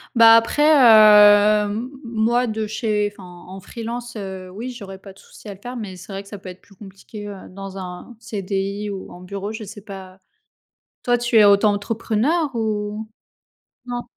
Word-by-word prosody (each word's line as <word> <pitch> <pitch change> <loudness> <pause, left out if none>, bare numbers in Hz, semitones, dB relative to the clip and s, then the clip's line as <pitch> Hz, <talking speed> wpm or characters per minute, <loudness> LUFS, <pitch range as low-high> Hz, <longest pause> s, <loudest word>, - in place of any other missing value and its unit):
Bah, 230 -1 +8
après, 230 +6 +2
heu, 215 -6 +7
m 225 +5 -4
moi 235 +2 0
de 220 0 -3
chez 210 -1 -1
Enfin, 195 - -14 0.2
en 190 +1 -9
freelance, 235 +4 -7
heu, 190 -3 -7
oui, 230 +7 -7
j'aurais 200 -5 -10
pas 195 0 -14
de 195 - -21
souci - - -16
à 205 - -6
le 195 - -17
faire. 245 +1 -7
Mais 205 -5 -7
c'est 190 - -12
vrai 195 +1 -6
que 195 - -17
ça 205 - -9
peut 185 - -10
être 180 - -12
plus 200 - -22
compliqué, 205 +2 -11
heu, 205 - -7
dans 195 +1 -9
un 185 +5 -9
CDI 200 -1 -4
ou 195 -2 -7
en 180 - -12
bureau, 200 +2 -6
je 220 -1 -7
sais 205 +1 -11
pas. 190 -2 -11 0.8
Toi, 245 0 +2
tu 240 -1 -1
es 210 - +7
auto-entrepreneure 220 +8 +1
ou 215 -1 -3 0.8
non? 245 0 -4
210 Hz, 185 wpm, -21 LUFS, 195-230 Hz, 0.8 s, Bah